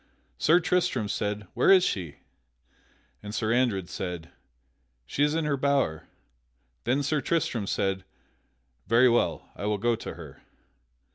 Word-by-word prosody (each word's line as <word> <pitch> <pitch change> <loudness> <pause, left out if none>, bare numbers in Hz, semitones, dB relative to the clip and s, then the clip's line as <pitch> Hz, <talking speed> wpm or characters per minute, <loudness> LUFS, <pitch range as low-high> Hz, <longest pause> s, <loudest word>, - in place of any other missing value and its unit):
Sir 170 +3 +5
Tristram 165 -11 0
said, 105 0 -2
"Where - - +2
is 190 -2 +7
she?" 90 - -2 1.1
And 105 +1 -7
Sir 110 0 0
Andred 115 -8 +1
said, 90 -3 -6 0.7
"She - - -4
is 150 +1 +2
in 165 -1 0
her 145 -2 0
bower." 135 - 0 0.8
Then 130 +4 +1
Sir 145 +1 0
Tristram 125 -9 -1
said, 95 -1 -1 0.8
"Very 120 +2 +5
well, 120 0 +1
I 105 - -4
will 105 0 +1
go 120 +3 +1
to - - -7
her." - - -12
120 Hz, 140 wpm, -27 LUFS, 100-145 Hz, 1.1 s, is